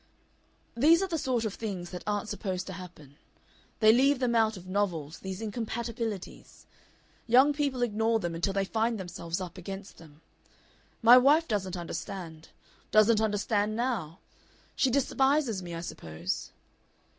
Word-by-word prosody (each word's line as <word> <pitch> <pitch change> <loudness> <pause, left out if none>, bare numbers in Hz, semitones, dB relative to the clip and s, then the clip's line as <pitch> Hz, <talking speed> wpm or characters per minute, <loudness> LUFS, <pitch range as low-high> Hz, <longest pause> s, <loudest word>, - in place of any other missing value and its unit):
"These 320 +9 +5
are - - -1
the 330 -3 -2
sort 250 -4 0
of 210 - -2
things 190 -6 -5
that 180 -1 -7
aren't 205 0 -1
supposed 190 -3 -3
to 190 - -7
happen. 165 -6 -11 0.6
They 215 0 +7
leave 275 +3 +4
them 250 -2 0
out 220 -2 +2
of 180 - -11
novels 180 -6 -2
these 190 +1 -6
incompatibilities. 225 -1 -5 0.6
Young 260 +5 +6
people 280 -4 -1
ignore 225 0 +1
them 175 -4 -3
until 175 +4 -1
they 195 0 0
find 225 +2 0
themselves 175 -2 -5
up 185 0 -7
against 195 +2 -8
them. 155 -2 -16 0.8
My 240 +2 +9
wife 300 +6 +4
doesn't 190 -5 -2
understand, 170 -1 -7 0.4
doesn't 215 +1 +5
understand 210 0 0
now. 220 -10 -2 0.6
She 265 - +2
despises 270 -3 +1
me, 175 -2 -7
I 165 - -5
suppose.... 85 - -5
210 Hz, 145 wpm, -29 LUFS, 180-235 Hz, 0.8 s, My